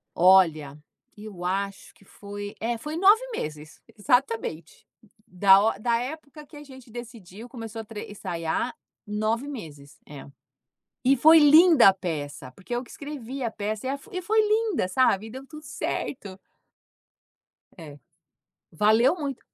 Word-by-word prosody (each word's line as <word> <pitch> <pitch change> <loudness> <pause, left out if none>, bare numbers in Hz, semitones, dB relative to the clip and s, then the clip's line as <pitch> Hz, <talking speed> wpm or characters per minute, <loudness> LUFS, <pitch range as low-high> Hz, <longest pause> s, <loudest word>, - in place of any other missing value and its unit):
Olha, 165 -6 +4 0.4
eu 205 -4 -10
acho 195 +2 -3
que 195 - -23
foi 205 +1 -9
é 235 +1 -2
foi 300 +7 -6
9 395 +6 +5
meses, 150 0 -7 0.2
exatamente. 225 - -1 0.4
Da 195 0 +5 0.2
o - - -15
da 235 +2 +1
época 300 +3 -8
que 290 - -17
a 295 - -10
gente 260 -4 -15
decidiu, 230 -2 -10
começou 225 -3 -8
a - - -10
tre 210 -1 -9
ensaiar, 180 +3 -3 0.3
9 215 +5 -2
meses, 150 - -10
é. 145 -2 -11 0.8
E 270 +2 +4
foi 315 +6 +7
linda 310 - +7
a 195 - +4
peça, 150 -7 -6
porque 195 - -8
eu 240 - -2
que 245 - -16
escrevi 275 -3 -7
a 235 - -1
peça 215 +2 -5
e - - -1
a 280 - -3
e 370 -3 -5
foi 435 +5 +2
linda, 425 - 0
sabe, 220 -1 +1
deu 260 +3 -10
tudo 305 +1 -12
certo. 245 - -5 1.4
É, 150 -4 -11 0.7
valeu 220 - +3
muito. 280 -5 -5
225 Hz, 145 wpm, -25 LUFS, 190-275 Hz, 1.4 s, foi